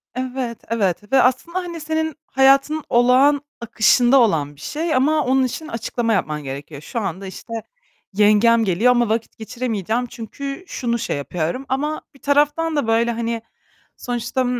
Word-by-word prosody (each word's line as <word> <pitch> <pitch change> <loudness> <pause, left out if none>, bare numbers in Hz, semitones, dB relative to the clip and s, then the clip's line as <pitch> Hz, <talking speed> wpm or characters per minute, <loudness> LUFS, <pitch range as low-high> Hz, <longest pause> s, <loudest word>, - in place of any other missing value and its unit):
Evet, 255 -2 -3
evet 205 -2 -1
ve 265 - +6
aslında 300 +9 +1
hani 345 -2 -6
senin 315 -1 -2
hayatının 275 +3 +3
olağan 255 +4 +4 0.2
akışında 240 +3 +4
olan 150 -10 +1
bir 140 - -17
şey 315 0 -2
ama 300 +3 +2
onun 265 +1 +3
için 305 +5 -4
açıklama 230 -1 -2
yapman 150 -6 -1
gerekiyor. 140 +2 -7
Şu 230 - -4
anda 195 -1 -4
işte 230 +4 -9 0.6
yengem 215 +2 +4
geliyor 205 +7 +3
ama 240 -3 +2
vakit 225 0 -2
geçiremeyeceğim 225 0 -2
çünkü 275 - -7
şunu 235 -1 -2
şey 220 - -2
yapıyorum 170 - -3
ama 295 +4 -1
bir - - -20
taraftan 295 +3 +2
da 285 -6 0
böyle 230 +1 +2
hani 230 0 -3 0.6
sonuçta, 245 +1 -2
240 Hz, 150 wpm, -21 LUFS, 220-275 Hz, 0.6 s, ve